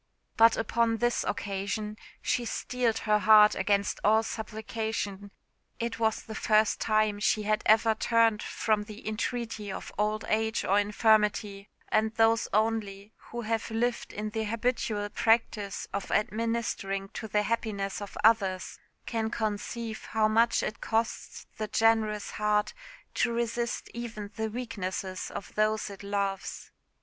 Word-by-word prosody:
But 225 -1 +6
upon 225 +1 +1
this 240 +1 +1
occasion 205 +1 -3 0.3
she 245 - +1
steeled 235 0 -1
her 210 -1 +4
heart 210 0 +7
against 200 +1 0
all 220 +2 +4
supplication. 220 -2 -4 0.5
It 230 -1 -3
was 220 -1 +1
the 220 - -8
first 215 0 +2
time 215 -1 +2
she 215 0 +2
had 215 +1 +1
ever 220 +1 +5
turned 225 -1 +2
from 215 -2 0
the 215 +1 -10
entreaty 220 -1 -3
of - - -7
old 215 +1 0
age 220 +1 0
or 200 +2 +4
infirmity; 210 -1 +2 0.2
and 220 +1 +1
those 225 0 +3
only 210 -1 -1 0.2
who 240 - -4
have 225 0 -2
lived 235 +2 -1
in 215 +1 -4
the 220 0 -2
habitual 220 -2 -1
practice 215 -3 +1
of 200 - -3
administering 215 -3 -1
to 220 - -6
the 210 0 +1
happiness 210 -3 -2
of 205 - -8
others 195 -4 +2 0.3
can 225 -1 -1
conceive 220 +1 -3
how 220 -1 +2
much 225 +2 +3
it 215 - -4
costs 225 0 -2
the 215 - -2
generous 220 -2 +2
heart 210 - +1 0.4
to - - +1
resist 235 0 -2
even 225 -4 -6
the 220 0 -2
weaknesses 195 -5 -4
of 185 - -8
those 215 0 +1
it 195 - -10
loves. 200 -1 -3
215 Hz, 140 wpm, -29 LUFS, 205-225 Hz, 0.5 s, heart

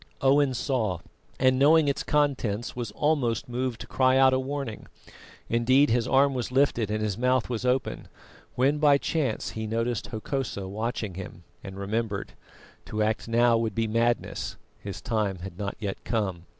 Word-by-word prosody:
Owen 135 0 +3
saw, 115 - 0 0.4
and 130 0 +3
knowing 155 +2 +5
its 140 - 0
contents, 130 -7 0
was 120 -3 -4
almost 145 -7 0
moved 125 -1 -3
to - - -6
cry 130 0 +3
out 135 0 +6
in 130 0 +1
warning. 135 -5 -5 0.6
Indeed, 130 +4 +3
his 120 -1 +1
arm 135 +1 +4
was 125 -1 -3
lifted 130 -5 +2
and 110 0 -1
his 105 0 -2
mouth 125 0 +1
was 120 +1 -3
open, 125 0 -1 0.5
when 140 +4 +2
by 145 -2 +5
chance 140 -6 -1
he 110 0 -4
noted 115 +1 -1
Hokosa 110 -3 -4
watching 110 0 -3
him, 90 -1 -8 0.2
and 95 0 -8
remembered. 100 +1 -3 0.5
To 110 0 -1
act 110 +1 -1
now 115 0 +4
would 110 -3 -2
be 115 - +1
madness, 115 +2 -1 0.2
his 100 -1 -7
time 105 -4 -1
had 95 0 -9
not 100 -1 -3
yet 100 -3 -4
come. 95 -7 -2
120 Hz, 165 wpm, -27 LUFS, 110-130 Hz, 0.6 s, out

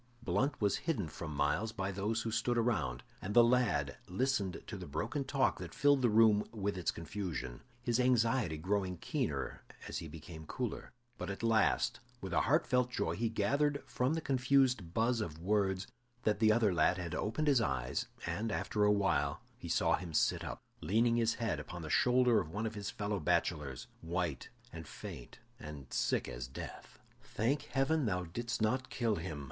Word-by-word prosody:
Blunt 120 +8 0
was 100 -2 +2
hidden 110 - 0
from 80 +1 -7
Myles 75 +10 0
by 95 -2 -3
those 105 +4 -1
who 115 - -2
stood 120 +2 +1
around, 80 - 0 0.2
and 100 +2 -4
the 120 - +9
lad 115 - +2
listened 100 -1 -1
to - - -6
the - - -7
broken 110 - -2
talk 135 0 +1
that - - -7
filled 145 -1 +4
the 120 - +4
room 105 -1 +5
with 100 -2 -2
its 90 -2 -1
confusion, 85 -8 -4 0.2
his 120 0 +1
anxiety 120 -7 +2
growing 95 +2 -1
keener - - -2 0.3
as - - -3
he 80 - -7
became 80 0 -10
cooler. - - -4 0.3
But - - -4
at 100 +3 -5
last, 115 -1 +2 0.2
with - - -6
a - - +4
heartfelt 125 -1 +2
joy, 125 - -1
he 115 +1 0
gathered 140 +7 +1
from 130 +5 0
the 165 - -2
confused 130 - +2
buzz 115 +1 +2
of 80 -7 -4
words 95 +1 +1 0.4
that 105 -1 +1
the 110 -1 +5
other 110 -3 +3
lad 85 +2 +3
had 90 -2 -4
opened 110 +11 -1
his 135 -5 +5
eyes 65 - -1 0.2
and, 110 +1 -2
after 105 0 0
a 105 - +5
while, 95 -9 +1
he - - -9
saw - - +3
him 85 -2 -7
sit - - +2
up, - - -6 0.2
leaning 115 +8 +3
his 115 -1 +2
head 115 -10 -1
upon 85 +3 -7
the 80 - -5
shoulder 125 -2 +4
of 75 - -4
one 105 +6 -3
of 110 - -2
his 100 -2 -4
fellow 100 -1 -2
bachelors, 70 -4 0 0.2
white 85 -3 -2 0.2
and 80 -2 -8
faint - - -9 0.2
and 75 -4 -9
sick - - +1
as - - -5
death. 65 - -9 0.2
"Thank 130 +3 -1
Heaven 140 0 +1
that - - +1
thou 90 0 -1
didst 115 +7 -3
not 130 +4 0
kill 115 -4 0
him!" 80 -3 -5
105 Hz, 185 wpm, -34 LUFS, 85-120 Hz, 0.4 s, the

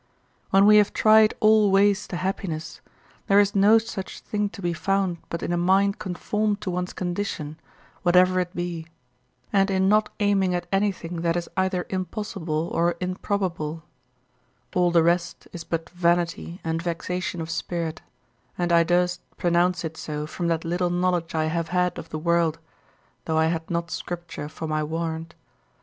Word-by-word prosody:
When 195 +1 +5
we 210 0 +8
have 210 -1 +4
tried 215 0 +5
all 215 -1 +5
ways 200 +1 +3
to 175 - -4
happiness, 170 -4 -4 0.5
there 200 +1 +5
is 205 0 +3
no 205 +3 +6
such 220 -4 -5
thing 210 -1 -2
to - - -12
be 175 -2 -1
found 190 -1 0
but 170 - -4
in 175 - -1
a - - +1
mind 195 +3 +2
conformed 210 +3 -1
to 195 -3 -3
one's 180 0 -2
condition, 175 -4 -4 0.4
whatever 185 +1 +4
it 180 +1 -3
be, 175 -2 -4 0.7
and 195 0 +3
in 190 0 +2
not 215 +1 +3
aiming 195 -3 +2
at 175 - -2
anything 190 -4 -1
that 170 0 +1
is 175 -1 -2
either 190 -1 0
impossible 185 -4 -3
or 170 +1 +2
improbable; 180 -4 -2 0.9
all 180 -1 +3
the 170 -1 +4
rest 170 0 0
is 170 - -6
but 165 0 -4
vanity 175 0 0
and 165 0 -1
vexation 175 +1 -3
of 165 0 -4
spirit, 165 -2 -3 0.6
and 175 -1 0
I 170 0 +6
durst 180 +1 +1 0.2
pronounce 175 +1 +2
it 160 0 -6
so 150 -1 -4
from 170 +3 -4
that 165 0 0
little 175 +1 0
knowledge 175 -2 0
I 155 0 +1
have 165 +1 -1
had 180 +1 0
of - - -9
the 155 - -4
world, 170 0 +1 0.7
though 160 -1 0
I 160 - +4
had 160 -1 -5
not 170 -1 -2
Scripture 175 -4 -5
for 160 - -7
my 155 0 0
warrant. 160 +1 -4
175 Hz, 170 wpm, -25 LUFS, 165-195 Hz, 0.9 s, we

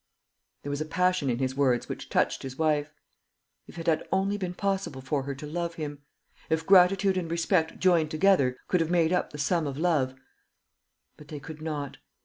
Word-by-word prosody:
There 145 - -4
was 145 +1 -3
a - - -1
passion 180 -2 +1
in 120 - 0
his 130 0 -1
words 130 -4 +2
which - - -7
touched - - +1
his 130 0 -7
wife. 150 -2 +1 0.8
If - - -13
it 165 - -6
had 160 -2 +2
only 195 +1 +1
been 185 -3 -4
possible 195 -8 -2
for 135 +2 -1
her 140 +1 -5
to 140 - -8
love 170 +2 -3
him! 145 -3 -6 0.5
If 160 0 0
gratitude 190 +1 +5
and 170 -3 -2
respect, 170 0 +1
joined 170 -4 +3
together, 155 -6 +3
could 180 - +2
have 165 - 0
made 170 -1 +2
up 180 - 0
the 150 - -9
sum 155 +2 0
of 140 -1 -5
love; 150 -6 +1 1.0
but 150 - -14
they 150 -1 -7
could 155 +2 -10
not. 150 -3 -4
160 Hz, 195 wpm, -27 LUFS, 145-180 Hz, 1.0 s, gratitude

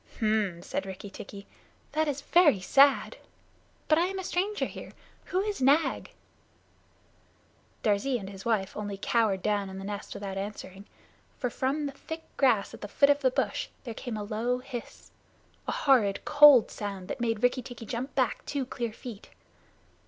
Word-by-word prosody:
"H'm!" 215 -6 0
said 195 - -3
Rikki 190 +1 -8
tikki, 200 +1 -9 0.5
"that 315 0 +1
is 285 -1 -2
very 295 - +4
sad 275 - +4 0.7
but 310 0 +4
I 350 - +2
am 385 +1 -4
a 380 - -4
stranger 390 +4 -1
here. - - -9 0.3
Who 370 - 0
is 410 -6 -3
Nag?" 285 +5 +3 1.7
Darzee 220 +5 +1
and 195 -4 -7
his 195 -1 -9
wife 210 -5 0
only 205 -1 -4
cowered 200 -3 +1
down 205 -2 0
in 190 - -8
the 195 - -6
nest 205 0 -6
without 195 -1 -5
answering, 200 -1 -7 0.5
for 250 - -2
from 275 +5 -1
the 280 - -3
thick 320 +4 -8
grass 230 -7 +2
at - - -11
the - - -5
foot 280 +7 +4
of 285 - +2
the 265 -3 +3
bush 255 - -1 0.2
there 235 - -6
came 225 0 -5
a 210 - -4
low 225 +4 -1
hiss 250 -2 -9 0.6
a - - 0
horrid 230 -8 +2
cold 290 -5 +7
sound 195 -3 -5
that - - -5
made 225 -2 -1
Rikki 250 +1 +3
tikki 240 -2 -9
jump 245 +5 -5
back 255 -4 0
two 280 -2 -2
clear 235 -3 -4
feet. 230 -3 -10
235 Hz, 175 wpm, -28 LUFS, 205-280 Hz, 1.7 s, cold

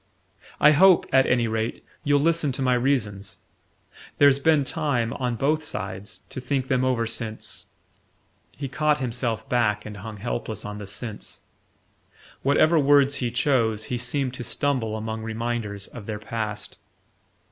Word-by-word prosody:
"I 150 - +7
hope, 185 +4 +6
at 135 0 +5
any 120 -2 +2
rate, 110 +1 -3 0.2
you'll 145 0 +3
listen 165 -2 +2
to 135 - -3
my 130 -1 +3
reasons. 120 -6 -1 0.8
There's 140 -1 +6
been 155 0 +3
time, 135 -7 -1
on 125 -2 -2
both 155 +6 +1
sides, 100 -7 -5
to 130 - -6
think 130 0 -2
them 130 -1 +2
over 125 -3 +1
since 115 -1 -2 0.4
" - - -40
He 140 - -4
caught 150 +3 +1
himself 120 -4 -2
back 105 -4 +1
and 105 -1 -7
hung 105 +1 -8
helpless 110 0 -4
on 105 0 -6
the 105 - -7
"since": 105 +2 -5 1.0
whatever 155 +4 +4
words 140 0 +4
he 125 - -1
chose, 115 -3 +1
he 120 - -1
seemed 125 +1 -1
to 125 - -5
stumble 120 -3 -1
among 110 0 -4
reminders 110 -2 -3
of 110 -5 -10
their 110 -1 -3
past. 110 -1 -5
120 Hz, 155 wpm, -25 LUFS, 110-140 Hz, 1.0 s, I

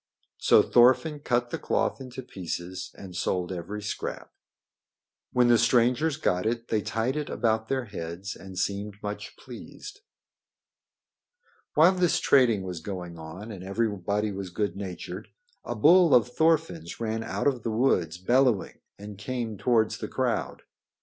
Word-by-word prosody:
So - - +6
Thorfinn 130 +5 +4
cut 120 -3 0
the - - -3
cloth - - 0
into 130 0 -8
pieces 90 -3 -6
and 95 -2 -10
sold 90 0 -1
every 95 +4 -5
scrap. 105 - -5 1.0
When 125 -1 +4
the 120 -1 +5
strangers 125 +5 +3
got 90 -10 0
it 115 0 -2
they 110 -2 +1
tied 115 +6 -1
it 150 -1 -3
about 110 -1 0
their 130 -1 -1
heads 95 -1 -6
and 95 -1 -11
seemed 100 +2 -2
much 105 0 -6
pleased. 415 0 -10 1.8
While 165 +4 +7
this 180 -2 +2
trading 120 -8 +4
was 90 -3 -5
going 90 -2 -6
on 85 +8 -8
and 95 -3 -8
everybody 105 0 -1
was 95 -1 -5
good 95 0 -2
natured, 95 -3 -6 0.4
a 120 - -4
bull 165 - +6
of 125 0 +4
Thorfinn's 155 - 0
ran 110 -1 -2
out - - -3
of 135 -4 +2
the 115 - -3
woods 110 -8 +1
bellowing 120 +2 +2 0.2
and 105 0 -9
came 120 -1 -3
towards 110 +1 +1
the - - -4
crowd. - - -2
110 Hz, 150 wpm, -27 LUFS, 95-125 Hz, 1.8 s, While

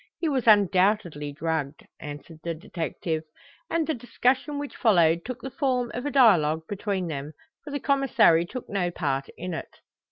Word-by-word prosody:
He 335 - -1
was 265 -6 0
undoubtedly 190 -6 +3
drugged," 155 -1 -3
answered 150 +2 -9
the 170 -1 -3
detective; 165 -2 -4 0.5
and 330 -1 +1
the 315 - 0
discussion 260 +4 0
which 290 -1 -5
followed 170 -7 +3
took 250 -1 -6
the 265 - -5
form 250 -3 0
of 250 +4 -3
a - - -2
dialogue 170 - +4
between 200 -2 -2
them, 150 -2 -5 0.3
for - - -9
the 285 0 -3
Commissary 245 - +4
took 255 +5 -7
no 185 -3 -1
part 140 -6 -2
in 180 +1 -5
it. - - -7
195 Hz, 165 wpm, -26 LUFS, 160-255 Hz, 0.5 s, dialogue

